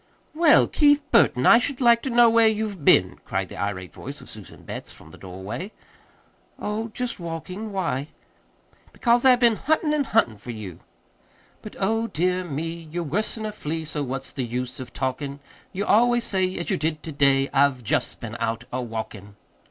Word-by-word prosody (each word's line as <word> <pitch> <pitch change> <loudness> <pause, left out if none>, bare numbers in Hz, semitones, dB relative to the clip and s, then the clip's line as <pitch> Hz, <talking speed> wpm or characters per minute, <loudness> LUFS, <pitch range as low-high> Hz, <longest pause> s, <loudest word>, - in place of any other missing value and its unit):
"Well, 320 -1 +5
Keith 290 -1 +3
Burton, 130 - +4
I 235 - +8
should 260 +1 -2
like 235 -2 +5
to 270 - -3
know 240 -1 +6
where 230 0 +5
you've 215 -6 -2
been," 90 -8 +4
cried - - -3
the - - -9
irate 95 -5 -4
voice - - -8
of - - -10
Susan - - -11
Betts - - -7
from - - -15
the - - -13
doorway. 100 - -7 0.9
"Oh, 215 +2 -3
just 235 0 -4
walking. 180 +5 -6
Why?" 165 -8 -2 0.9
"Because 240 +1 +2
I've 250 -1 +6
been 235 -3 +4
huntin' 310 0 +1
and 290 -2 0
huntin' 120 - +2
for 120 - -12
you. 105 -7 -7 0.8
But, 215 - -10
oh, 225 +3 0
dear 180 -1 0
me, 165 +1 -5
You're 175 +1 -2
worse'n 215 +7 -2
a 215 - -3
flea, 160 -5 -4
So 150 -1 -2
what's 135 -1 -4
the 130 - -3
use 125 +3 -4
of 125 -2 -8
talkin'? 140 +2 -3 0.3
You 200 +2 -3
always 240 +2 +3
say, 185 -3 0
As 175 - -3
you - - +1
did 155 +1 -2
to 160 - -6
day, 140 -1 +3
I've 135 -2 +3
just 105 - -1
been 115 -1 -7
out 115 0 -2
a 130 - -1
walkin'!" 110 -3 -7
170 Hz, 185 wpm, -24 LUFS, -, 0.9 s, I